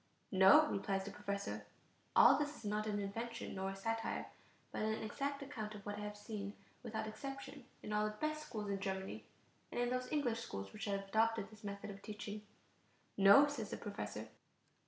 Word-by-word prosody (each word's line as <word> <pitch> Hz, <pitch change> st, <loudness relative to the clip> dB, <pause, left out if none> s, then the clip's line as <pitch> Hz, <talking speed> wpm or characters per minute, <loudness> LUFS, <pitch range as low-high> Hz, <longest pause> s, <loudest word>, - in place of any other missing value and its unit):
"No," 195 Hz, +12 st, +8 dB
replies 195 Hz, -6 st, 0 dB
the 200 Hz, -, -6 dB
professor 200 Hz, -1 st, -3 dB, 0.5 s
(all -, -, +9 dB
this 295 Hz, 0 st, -1 dB
is 225 Hz, -, -11 dB
not 210 Hz, +1 st, 0 dB
an 210 Hz, -1 st, 0 dB
invention 230 Hz, +4 st, -3 dB
nor 190 Hz, 0 st, -2 dB
a 195 Hz, -, -4 dB
satire, 225 Hz, +3 st, -1 dB, 0.5 s
but -, -, -3 dB
an 220 Hz, +1 st, 0 dB
exact 280 Hz, +6 st, -2 dB
account 220 Hz, -7 st, -5 dB
of 205 Hz, -, -10 dB
what 205 Hz, 0 st, -3 dB
I -, -, -4 dB
have 210 Hz, 0 st, -5 dB
seen 205 Hz, -1 st, -5 dB, 0.3 s
without 220 Hz, -2 st, -3 dB
exception 270 Hz, +4 st, -6 dB, 0.2 s
in 210 Hz, -, -3 dB
all 210 Hz, 0 st, +3 dB
the 215 Hz, 0 st, -2 dB
best 305 Hz, +4 st, -2 dB
schools 210 Hz, -4 st, -3 dB
in 195 Hz, -, -1 dB
Germany, 190 Hz, -1 st, -3 dB, 0.5 s
and -, -, -2 dB
in 245 Hz, 0 st, +2 dB
those 255 Hz, 0 st, -1 dB
English 250 Hz, -7 st, +1 dB
schools 100 Hz, -, -5 dB
which 210 Hz, -2 st, -4 dB
have 200 Hz, -1 st, 0 dB
adopted 220 Hz, 0 st, +2 dB
this 215 Hz, 0 st, -15 dB
method 200 Hz, 0 st, -4 dB
of 200 Hz, 0 st, -10 dB
teaching). 210 Hz, 0 st, -5 dB, 0.7 s
"No," 200 Hz, +8 st, +9 dB
says 260 Hz, -8 st, -3 dB
the -, -, -3 dB
professor. 110 Hz, -, -5 dB
215 Hz, 190 wpm, -38 LUFS, 200-235 Hz, 0.7 s, all